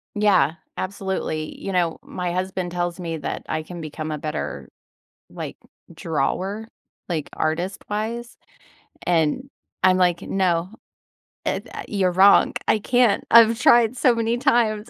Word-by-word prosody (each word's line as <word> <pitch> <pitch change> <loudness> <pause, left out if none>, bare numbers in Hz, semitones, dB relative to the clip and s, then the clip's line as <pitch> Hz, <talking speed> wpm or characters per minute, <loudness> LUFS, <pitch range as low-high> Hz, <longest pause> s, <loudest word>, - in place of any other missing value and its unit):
Yeah, 190 -7 +3 0.2
absolutely, 185 -5 -3
you 195 - -4
know, 175 -3 0
my 180 -1 -4
husband 185 -1 -2
tells 175 0 -2
me 165 -2 -4
that - - -5
I 155 0 -2
can 175 +1 -8
become 155 0 -5
a 150 - -2
better, 150 - -5 0.6
like, - - -7 0.4
drawer? 190 +6 -2 0.4
Like, 155 -4 -2
artist-wise? 210 +8 -3 0.7
And, 175 - +1 0.4
I'm 185 0 +6
like, 175 -2 +2
"No. 180 -2 0 0.8
Eh, - - 0
tha - - -9
you're 190 -4 +1
wrong, 195 +3 +6
I 215 - +3
can't, 245 -2 +2
I've 230 0 +7
tried 240 -1 +5
so 250 - +4
many 230 +1 0
times," 235 -4 +1
185 Hz, 135 wpm, -23 LUFS, 170-215 Hz, 0.8 s, I've